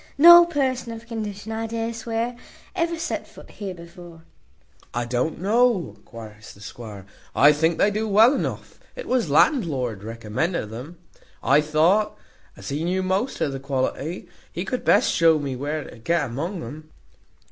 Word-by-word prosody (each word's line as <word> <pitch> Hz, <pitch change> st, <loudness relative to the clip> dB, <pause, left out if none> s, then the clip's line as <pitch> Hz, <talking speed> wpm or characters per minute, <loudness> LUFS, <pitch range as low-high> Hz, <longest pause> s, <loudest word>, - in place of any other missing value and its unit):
no 345 Hz, +3 st, +10 dB
person 260 Hz, -7 st, -1 dB
of 225 Hz, 0 st, -9 dB
condition, 220 Hz, -2 st, -6 dB
I 225 Hz, 0 st, -3 dB
dare 230 Hz, +1 st, -3 dB
swear, 230 Hz, +1 st, -3 dB, 0.4 s
ever 335 Hz, 0 st, -1 dB
set 325 Hz, -, -4 dB
foot -, -, -15 dB
here 195 Hz, -3 st, -6 dB
before." 170 Hz, -1 st, -13 dB, 0.7 s
"I 120 Hz, 0 st, -1 dB
don't 125 Hz, +6 st, -2 dB
know," 200 Hz, -, +1 dB
cries 110 Hz, -2 st, -11 dB
the -, -, -18 dB
squire, 105 Hz, -3 st, -9 dB, 0.3 s
"I 145 Hz, +3 st, +7 dB
think 160 Hz, +2 st, +1 dB
they 205 Hz, -, +3 dB
do 215 Hz, +2 st, -2 dB
well 220 Hz, +5 st, +6 dB
enough; -, -, -4 dB, 0.2 s
it -, -, -7 dB
was 250 Hz, -10 st, +1 dB
landlord 145 Hz, -, +2 dB
recommended 115 Hz, -, -3 dB
them. 130 Hz, +10 st, -8 dB, 0.5 s
I 140 Hz, +3 st, +4 dB
thought, 160 Hz, +8 st, +2 dB, 0.4 s
as -, -, -8 dB
he 145 Hz, +3 st, -2 dB
knew 185 Hz, +2 st, 0 dB
most 190 Hz, +8 st, -1 dB
of 145 Hz, -, +1 dB
the 135 Hz, -, -5 dB
quality, 140 Hz, +4 st, -3 dB, 0.2 s
he 175 Hz, -, -4 dB
could 250 Hz, +5 st, -3 dB
best -, -, +4 dB
shew 165 Hz, -1 st, +4 dB
me 140 Hz, -3 st, -3 dB
where 145 Hz, +3 st, -4 dB
to 120 Hz, -, -13 dB
get 165 Hz, +5 st, 0 dB
among 160 Hz, -, -4 dB
um." 155 Hz, +6 st, -9 dB
170 Hz, 165 wpm, -23 LUFS, 135-225 Hz, 0.7 s, no